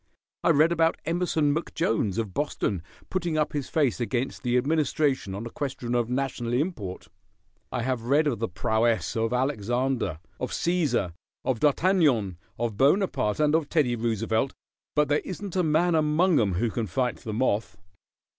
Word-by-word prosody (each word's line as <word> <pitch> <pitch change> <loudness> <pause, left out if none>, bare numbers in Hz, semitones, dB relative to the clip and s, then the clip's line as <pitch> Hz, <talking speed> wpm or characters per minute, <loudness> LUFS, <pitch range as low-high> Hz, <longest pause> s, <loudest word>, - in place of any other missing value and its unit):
I - - +3
read 155 +4 +5
about 165 -1 +2
Emerson 165 -3 +1
McJones, 115 - -1
of 110 -5 -2
Boston, 105 - -1 0.3
putting 175 -4 -1
up 150 0 0
his 145 -3 -3
face 145 -7 +1
against 125 +2 -2
the 125 -1 +1
administration 140 -6 +1
on 105 +4 -5
a 115 - -6
question 130 -4 -4
of 120 -1 +1
national 125 -2 -2
import. 125 - -2 0.6
I 125 -2 -2
have 130 -2 -1
read 145 +5 +3
of 135 -7 0
the 115 - 0
prowess 110 +1 0
of 115 0 0
Alexander, 125 - 0 0.2
of - - -2
Cæsar, 160 - 0 0.3
of 125 -4 0
D'Artagnan, 145 - +2 0.2
of 115 -3 -2
Bonaparte, 140 - +2
and 150 -1 +3
of 160 -2 +1
Teddy 140 -7 +2
Roosevelt, 115 +2 0 0.4
but 150 0 +3
there 145 +1 +2
isn't 190 0 -6
a 185 - +3
man 170 +2 +2
among 155 +2 +3
'em 100 -4 +1
who 110 +5 0
can 115 -1 -2
fight 125 +6 -1
the 110 - -7
moth. 105 -4 0
130 Hz, 165 wpm, -26 LUFS, 115-155 Hz, 0.6 s, read